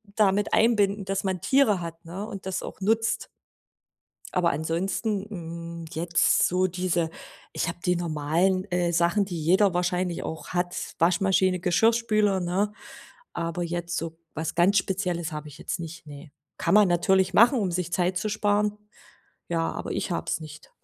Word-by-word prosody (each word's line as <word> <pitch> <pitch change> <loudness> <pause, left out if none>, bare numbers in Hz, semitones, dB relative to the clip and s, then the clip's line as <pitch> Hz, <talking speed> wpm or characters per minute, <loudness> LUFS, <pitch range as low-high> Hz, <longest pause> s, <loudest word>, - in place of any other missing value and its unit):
damit 205 -1 +2
einbinden, 205 -3 +3
dass 195 0 -2
man 190 -2 -1
Tiere 265 -9 +3
hat, 165 0 -8
ne, 185 +5 -6
und 200 -4 -8
das 190 -1 -3
auch - - -8
nutzt. 225 +3 +1 1.1
Aber 180 -2 +2
ansonsten, 185 +7 -1
hm, 170 -3 -7
jetzt 165 +1 +2
so 185 +1 +1
diese 175 -2 -1 0.4
ich - - -2
habe 170 - -4
die 180 -1 +2
normalen, 170 +3 +1
äh, 175 -1 +1
Sachen, 170 +4 +2
die 175 -4 -5
jeder 190 +4 +4
wahrscheinlich 180 0 -1
auch 160 - -6
hat: 180 0 -1 0.2
Waschmaschine, 185 +1 +3
Geschirrspüler, 215 +2 +2
ne? 185 +4 0 0.6
Aber 170 +1 -2
jetzt 175 0 -3
so 165 0 -4 0.2
was 160 +1 -3
ganz 185 +4 +4
Spezielles 180 -3 -1
habe 150 0 -6
ich 150 - -12
jetzt - - -4
nicht, 165 0 -8
ne. 145 +1 -11 0.3
Kann - - 0
man 210 -2 +7
natürlich 185 +2 +2
machen, 235 +6 +6
um 195 -4 0
sich 175 0 -2
Zeit 180 +1 +1
zu 215 +3 -2
sparen. 210 0 +1 0.7
Ja, 165 -1 0
aber - - -5
ich - - -2
habe 170 - -2
es - - -1
nicht. 150 -1 -11
180 Hz, 165 wpm, -26 LUFS, 170-195 Hz, 1.1 s, man